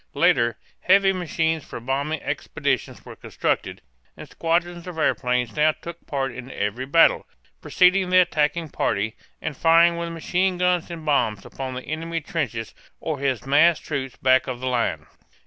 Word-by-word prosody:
Later, 120 Hz, -1 st, +3 dB, 0.2 s
heavy 195 Hz, +1 st, +4 dB
machines 160 Hz, -3 st, -1 dB
for -, -, -8 dB
bombing 140 Hz, +5 st, -2 dB
expeditions -, -, -3 dB
were -, -, -10 dB
constructed; -, -, -3 dB, 0.4 s
and -, -, -10 dB
squadrons 170 Hz, +1 st, -1 dB
of 180 Hz, -2 st, -7 dB
airplanes 125 Hz, -5 st, 0 dB
now 155 Hz, +1 st, +3 dB
took 170 Hz, +2 st, -11 dB
part 135 Hz, -2 st, -2 dB
in 130 Hz, +1 st, -9 dB
every 110 Hz, +6 st, -3 dB
battle, 165 Hz, +4 st, +4 dB, 0.3 s
preceding 185 Hz, +1 st, +3 dB
the 185 Hz, -, +4 dB
attacking 165 Hz, -2 st, +2 dB
party, 110 Hz, -4 st, -1 dB, 0.3 s
and 155 Hz, -2 st, -3 dB
firing 170 Hz, +3 st, +4 dB
with 170 Hz, 0 st, -3 dB
machine 180 Hz, +3 st, -1 dB
guns 180 Hz, -1 st, +1 dB
and 165 Hz, -2 st, -8 dB
bombs 115 Hz, -9 st, +1 dB
upon 130 Hz, -1 st, -6 dB
the 130 Hz, -, -6 dB
enemy's 165 Hz, 0 st, -4 dB
trenches 115 Hz, -9 st, -3 dB, 0.3 s
or 155 Hz, -4 st, -3 dB
his 135 Hz, -3 st, -1 dB
massed 155 Hz, +5 st, +4 dB
troops 135 Hz, -4 st, -4 dB
back 130 Hz, 0 st, +3 dB
of 125 Hz, -2 st, -4 dB
the 130 Hz, -, -5 dB
line. 115 Hz, -12 st, -1 dB
155 Hz, 160 wpm, -23 LUFS, 130-170 Hz, 0.4 s, heavy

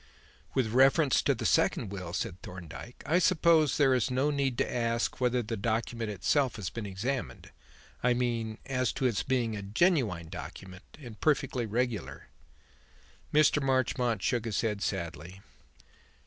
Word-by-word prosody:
"With 120 Hz, -5 st, +1 dB
reference 135 Hz, +2 st, +4 dB
to -, -, +2 dB
the -, -, -5 dB
second 105 Hz, -, +2 dB
will," 90 Hz, -4 st, -6 dB
said 90 Hz, 0 st, -4 dB
Thorndyke, 90 Hz, +6 st, -10 dB
"I 170 Hz, +3 st, +3 dB
suppose 165 Hz, -5 st, +4 dB
there 135 Hz, -3 st, +4 dB
is 125 Hz, -1 st, +1 dB
no 130 Hz, +4 st, +1 dB
need 135 Hz, -4 st, 0 dB
to -, -, -1 dB
ask 115 Hz, +1 st, -1 dB
whether 125 Hz, -1 st, +2 dB
the 115 Hz, +1 st, -3 dB
document 115 Hz, +1 st, -2 dB
itself 120 Hz, +7 st, +1 dB
has 105 Hz, -4 st, -5 dB
been 115 Hz, -3 st, -5 dB
examined; 120 Hz, +8 st, -4 dB, 0.5 s
I 125 Hz, 0 st, +3 dB
mean 115 Hz, -3 st, -1 dB
as 130 Hz, -2 st, 0 dB
to 130 Hz, -, -2 dB
its 120 Hz, -5 st, +1 dB
being 120 Hz, -4 st, 0 dB
a 100 Hz, -, -5 dB
genuine 105 Hz, -, +1 dB
document 95 Hz, -, -10 dB
and 120 Hz, -7 st, -11 dB
perfectly 135 Hz, -6 st, +1 dB
regular?" 120 Hz, 0 st, -3 dB, 1.0 s
Mr. 150 Hz, 0 st, +4 dB
Marchmont 125 Hz, -5 st, 0 dB
shook 120 Hz, -2 st, 0 dB
his 110 Hz, -3 st, -1 dB
head 105 Hz, -3 st, -2 dB
sadly. 90 Hz, -1 st, -4 dB
120 Hz, 150 wpm, -30 LUFS, 105-130 Hz, 1.0 s, reference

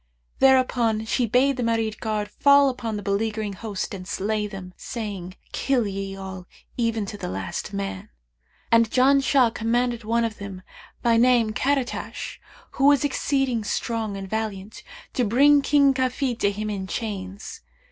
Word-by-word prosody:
There 265 Hz, 0 st, +7 dB
upon 230 Hz, -4 st, 0 dB
she 240 Hz, +2 st, 0 dB
bade 265 Hz, +4 st, +3 dB
the 250 Hz, -, -1 dB
Marid 225 Hz, -2 st, 0 dB
guard 215 Hz, -2 st, -2 dB
fall 280 Hz, +6 st, +5 dB
upon 230 Hz, -4 st, -4 dB
the 205 Hz, -, -6 dB
beleaguering 210 Hz, +1 st, -1 dB
host 205 Hz, -1 st, -5 dB
and 185 Hz, -2 st, -7 dB
slay 210 Hz, +2 st, -1 dB
them, 190 Hz, -3 st, -9 dB
saying, 200 Hz, -6 st, -6 dB, 0.2 s
'Kill 260 Hz, -4 st, +1 dB
ye 195 Hz, -1 st, -4 dB
all, 190 Hz, -2 st, -8 dB, 0.3 s
even 230 Hz, -3 st, 0 dB
to 205 Hz, +1 st, -8 dB
the -, -, -4 dB
last 95 Hz, 0 st, -4 dB
man;' 95 Hz, -1 st, -5 dB, 0.6 s
and 230 Hz, -1 st, +5 dB
Janshah 265 Hz, -1 st, +4 dB
commanded 240 Hz, +1 st, 0 dB
one 230 Hz, +2 st, +1 dB
of 220 Hz, -1 st, -5 dB
them, 195 Hz, -2 st, -8 dB, 0.4 s
by 235 Hz, -1 st, +4 dB
name 235 Hz, -2 st, +4 dB
Karαtash,[FN#565] 270 Hz, +1 st, -2 dB, 0.3 s
who 270 Hz, -, 0 dB
was 285 Hz, -1 st, +5 dB
exceeding 270 Hz, -4 st, 0 dB
strong 220 Hz, -1 st, -2 dB
and 195 Hz, 0 st, -6 dB
valiant, 215 Hz, -1 st, -4 dB, 0.3 s
to 250 Hz, -, +1 dB
bring 280 Hz, +6 st, +5 dB
King 280 Hz, -1 st, +4 dB
Kafid 255 Hz, -1 st, -1 dB
to 200 Hz, -, +3 dB
him 210 Hz, +1 st, -3 dB
in 190 Hz, -2 st, -4 dB
chains. 200 Hz, -2 st, -5 dB
225 Hz, 155 wpm, -24 LUFS, 200-250 Hz, 0.6 s, There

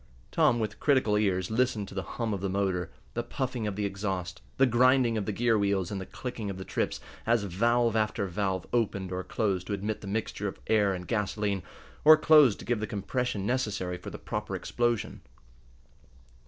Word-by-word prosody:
Tom, 120 Hz, -, +4 dB
with 105 Hz, -2 st, -3 dB
critical 130 Hz, -7 st, +3 dB
ears, 95 Hz, -2 st, +1 dB
listened 110 Hz, -3 st, +1 dB
to -, -, -10 dB
the 95 Hz, -, -2 dB, 0.2 s
hum 115 Hz, -3 st, -1 dB
of 95 Hz, -, -3 dB
the 100 Hz, -, -1 dB
motor, 95 Hz, -3 st, 0 dB, 0.2 s
the -, -, -1 dB
puffing 125 Hz, -4 st, -3 dB
of 100 Hz, -, -3 dB
the 105 Hz, 0 st, -1 dB
exhaust, 95 Hz, -2 st, -3 dB, 0.2 s
the 135 Hz, -, +6 dB
grinding 125 Hz, -1 st, +4 dB
of 105 Hz, -3 st, -2 dB
the -, -, 0 dB
gear 115 Hz, +1 st, +2 dB
wheels, 100 Hz, -2 st, 0 dB
and 100 Hz, -2 st, -3 dB
the 95 Hz, -, -7 dB
clicking 120 Hz, -5 st, -5 dB
of 95 Hz, -, -5 dB
the 95 Hz, -, -7 dB
trips, -, -, -2 dB, 0.3 s
as 115 Hz, -2 st, +3 dB
valve 115 Hz, +5 st, +2 dB
after 110 Hz, -2 st, +1 dB
valve 95 Hz, -1 st, -2 dB
opened 100 Hz, -6 st, 0 dB
or 90 Hz, 0 st, -3 dB
closed 95 Hz, -5 st, -1 dB
to -, -, -2 dB
admit 105 Hz, +2 st, -3 dB
the 100 Hz, -, -8 dB
mixture 105 Hz, +3 st, -2 dB
of -, -, -6 dB
air 105 Hz, -3 st, +3 dB
and 90 Hz, -1 st, -7 dB
gasoline, 105 Hz, -2 st, -1 dB, 0.4 s
or 155 Hz, +1 st, +9 dB
closed 150 Hz, -7 st, +6 dB
to -, -, -10 dB
give 120 Hz, -2 st, 0 dB
the 110 Hz, -, -3 dB
compression 105 Hz, +1 st, -2 dB
necessary 100 Hz, -7 st, -1 dB
for -, -, -7 dB
the -, -, -7 dB
proper -, -, -4 dB
explosion. 120 Hz, -2 st, -1 dB
105 Hz, 195 wpm, -29 LUFS, 95-120 Hz, 0.4 s, or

